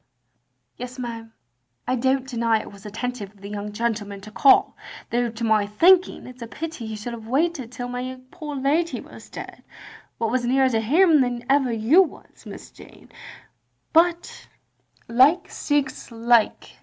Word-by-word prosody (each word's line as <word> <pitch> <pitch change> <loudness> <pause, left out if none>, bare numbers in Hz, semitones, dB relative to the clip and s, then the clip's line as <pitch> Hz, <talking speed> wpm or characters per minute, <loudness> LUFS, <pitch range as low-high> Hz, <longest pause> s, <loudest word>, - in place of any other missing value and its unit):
"Yes, 250 +1 -7
ma'am, 230 -2 -6 0.6
I 255 - +1
don't 260 +1 0
deny 230 -3 +1
it - - -9
was 200 +1 -12
attentive 215 -1 -5
of 200 - -22
the 200 - -8
young 210 0 -5
gentleman 210 -2 -3
to 215 +2 -11
call 270 +5 +4 0.2
— - - -16
^though 240 -1 0
to 235 - -5
my 215 -2 +2
thinking 355 - +4
it 255 0 -12
's - - -17
a 230 - -6
pity 310 -2 -6
he 220 - -5
should 215 +3 -6
have 225 -1 -9
waited 275 -1 0
till 245 -1 -5
my 250 +1 -5
poor 300 -2 -7
lady 300 +5 0
was - - -13
dead, - - -9 0.6
what 225 -1 -1
was 255 0 0
nearer 260 +2 +3
to 225 -1 +1
him 310 - +4
than 245 -1 -2
ever 270 -2 +3
you 230 - +5
was. 365 - -6
Miss - - -10
Jane - - -16 0.4
— - - -48
^but 340 +1 +1 0.6
like 265 +9 +4
seeks 290 -2 -2
like. 230 -1 +1
245 Hz, 175 wpm, -23 LUFS, 225-275 Hz, 0.6 s, you